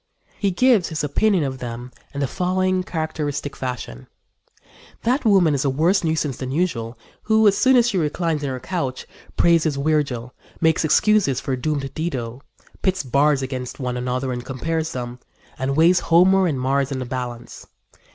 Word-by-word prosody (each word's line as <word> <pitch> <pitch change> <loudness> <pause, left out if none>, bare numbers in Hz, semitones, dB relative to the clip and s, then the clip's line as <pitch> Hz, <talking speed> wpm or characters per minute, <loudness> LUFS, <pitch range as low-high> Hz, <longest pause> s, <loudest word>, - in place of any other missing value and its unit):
He 200 - +1
gives 220 -1 +3
his 155 -2 -3
opinion 185 +5 +2
of 130 -2 -4
them 120 0 -6 0.2
in 140 - -5
the 140 - +1
following 185 +3 0
characteristic 155 -5 -3
fashion: 125 - -6 1.0
"That 255 +4 +1
woman 190 -7 +4
is 140 - 0
a 140 - +1
worse 165 +9 +2
nuisance 155 -4 -1
than 130 - -5
usual 130 -8 -2 0.2
who, 220 0 +3
as 200 - +4
soon 260 0 +4
as 240 -1 +5
she 200 -6 0
reclines 160 0 -1
on 140 - -1
her 130 -1 -4
couch, 130 -2 -3 0.3
praises 165 -3 +3
Virgil; 140 -5 -1 0.3
makes 160 0 +2
excuses 160 - +3
for 135 - -2
doomed 140 +1 -3
Dido; 130 -7 -4 0.4
pits 185 -4 0
bards 140 +1 +2
against 130 -1 -5
one 125 -2 -2
another 125 +1 -2
and 120 0 -5
compares 160 +5 -3
them, 125 -1 -5 0.4
and 135 +1 -1
weighs 175 +3 +5
Homer 185 +3 +4
and 145 -6 -1
Mars 135 +1 0
in 135 - -2
the 130 - -4
balance. 120 -1 -6
145 Hz, 170 wpm, -22 LUFS, 130-175 Hz, 1.0 s, as